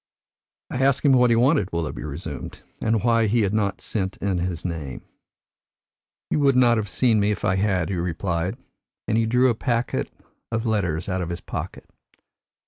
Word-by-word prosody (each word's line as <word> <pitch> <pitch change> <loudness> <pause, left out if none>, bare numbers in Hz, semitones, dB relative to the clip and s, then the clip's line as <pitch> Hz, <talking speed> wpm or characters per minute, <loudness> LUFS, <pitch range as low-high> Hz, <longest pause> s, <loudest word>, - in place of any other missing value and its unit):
"I 130 - -2
asked 140 +2 +2
him 140 - +6
what 125 -1 +5
he 115 - +4
wanted," 120 - +3
Willoughby 85 -4 -3
resumed, 75 0 -7 0.2
"and 110 -1 +1
why 115 -2 +3
he 115 +3 +2
had 100 -1 0
not 100 -2 0
sent 95 -3 -3
in 95 -3 -1
his 90 -1 -3
name. 80 -7 -5 1.3
'You - - +2
would 140 -2 +4
not 120 -2 +5
have 105 -2 -2
seen 110 +3 +2
me 100 0 +2
if 105 - -2
I 95 -3 +2
had,' 95 -4 +1
he 100 - -1
replied, 85 +1 -2 0.5
and - - +1
he 115 0 +2
drew 125 +3 +4
a - - +1
packet 120 +1 -1 0.4
of 110 +1 -1
letters 90 -8 0
out 95 -1 -1
of 85 - -3
his 85 - -5
pocket. - - -6
105 Hz, 185 wpm, -24 LUFS, 90-115 Hz, 1.3 s, him